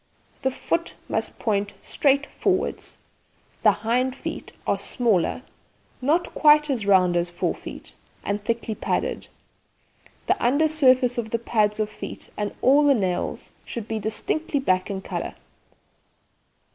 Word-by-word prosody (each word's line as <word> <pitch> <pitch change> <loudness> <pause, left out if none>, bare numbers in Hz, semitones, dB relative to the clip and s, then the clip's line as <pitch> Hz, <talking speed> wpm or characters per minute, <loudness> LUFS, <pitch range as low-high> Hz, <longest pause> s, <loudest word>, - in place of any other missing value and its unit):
The 265 - +2
foot 335 +5 -2
must - - -2
point 205 -3 -1
straight 280 0 +2
forward. 380 +4 -1 0.8
The - - +6
hind 250 +3 +1
feet - - -6
are - - +1
smaller, 230 -1 0 0.6
not 315 +7 +1
quite 300 -1 +5
as 225 -6 -2
round 185 -3 +5
as 175 0 +1
fore 175 - -1
feet, - - -10 0.3
and 205 0 -2
thickly 230 0 -1
padded. - - -2 1.0
The - - +1
under 285 +6 +4
surface 255 -5 +4
of 220 -2 -3
the 230 - 0
pads 215 -2 +1
of 215 - +1
feet 215 - -8
and 205 -1 -2
all 280 +3 +6
the 285 -1 +5
nails 185 -5 -2
should 230 -3 -6
be 220 -1 -2
distinctly 285 +8 -1
black 185 -8 +1
in 190 -1 -4
colour. - - -4
235 Hz, 140 wpm, -24 LUFS, 205-280 Hz, 1.0 s, The